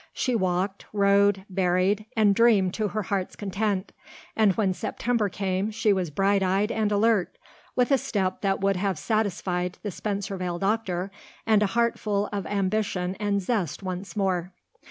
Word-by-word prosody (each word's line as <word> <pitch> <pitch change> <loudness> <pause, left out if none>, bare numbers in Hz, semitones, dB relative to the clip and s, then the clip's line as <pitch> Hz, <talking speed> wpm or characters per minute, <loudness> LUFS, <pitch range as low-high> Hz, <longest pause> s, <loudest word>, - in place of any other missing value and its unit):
She 255 - 0
walked, 190 -1 -1
rowed, 200 -1 +3
berried, 190 +2 +1
and 210 -2 +5
dreamed 205 -5 +4
to 215 -1 -1
her 210 +2 -3
heart's 190 -1 -2
content; 200 -1 -2 0.4
and 215 -3 +4
when 200 -4 +2
September 220 +1 -1
came 195 +1 -1
she 220 -1 +2
was 185 -3 -1
bright 195 +6 +2
eyed 195 +3 +1
and 215 -1 0
alert, 210 -2 +2 0.4
with 250 +2 +2
a 275 - +5
step 190 -5 -2
that 195 -1 0
would 195 -1 +2
have 195 -2 -1
satisfied 180 -4 -1
the 205 - -3
Spencervale 195 -3 -3
doctor 195 -2 -1 0.3
and 220 -2 +4
a 210 - +3
heart 235 +3 +1
full 205 -1 -1
of 200 -1 -3
ambition 195 -2 -1
and 200 -1 0
zest 200 -3 -2
once 185 0 -5
more. 185 -2 0
200 Hz, 160 wpm, -26 LUFS, 185-210 Hz, 0.4 s, and